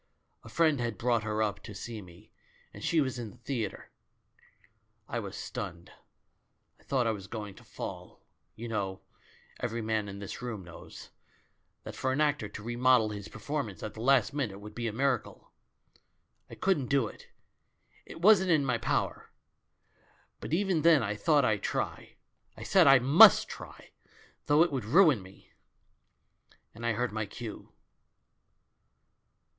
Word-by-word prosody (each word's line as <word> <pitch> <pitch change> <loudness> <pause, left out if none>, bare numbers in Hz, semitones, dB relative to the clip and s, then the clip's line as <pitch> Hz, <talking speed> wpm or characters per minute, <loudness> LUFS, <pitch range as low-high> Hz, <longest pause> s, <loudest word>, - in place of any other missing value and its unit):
A - - -12
friend 160 -4 +2
had 115 -3 -3
brought 120 0 +1
her 110 0 -1
up 100 -1 -2
to 105 -1 -10
see 110 +2 -7
me, 90 +3 -16 0.4
and - - -10
she 165 - +2
was 130 -4 -1
in 115 -3 -5
the 125 - -16
theatre. 120 -4 -5 1.2
I - - -3
was - - -7
stunned, 85 0 -7 0.9
I - - -24
thought 130 -3 0
I 115 - +2
was 100 -3 -7
going 105 -2 -6
to - - -17
fall. - - -8 0.4
You 120 - -7
know 100 -4 -3 0.3
— - - -27
every 115 -1 -3
man 110 -2 -1
in 100 - -8
this 100 +4 -7
room 115 -6 -5
knows 85 -1 -12 0.3
— - - -45
that - - -8
for 130 - -1
an 130 - -1
actor 145 -8 +1
to 105 - -9
remodel 120 -1 +3
his 105 -2 -7
performance 110 - -5
at 110 - -5
the 110 - -9
last 130 -2 +3
minute 125 -9 -2
would 105 +1 -11
be 120 +1 -3
a - - -2
miracle. 130 +1 -2 1.0
I - - -9
couldn't 170 -9 0
do 140 -2 +2
it, - - -10 0.8
it 165 - -11
wasn't 190 -2 +6
in 155 -5 +3
my 125 -3 0
power; 115 - -2 1.1
but - - -7
even 180 -1 +1
then 160 -5 +5
I 105 0 -1
thought 145 +3 +3
I'd 105 -2 +1
try. - - -3 0.4
I - - -8
said - - +4
I 135 0 +9
miist 135 +6 +7
try^ - - -11 0.6
though 150 +2 +6
it 175 - -1
would 130 -4 -2
ruin 150 - +5
me! 95 +1 -16 1.2
And 115 +2 -5
I 120 - +2
heard 125 +3 -1
my 110 -1 -3
cue. 110 +1 -9
120 Hz, 165 wpm, -30 LUFS, 105-140 Hz, 1.2 s, I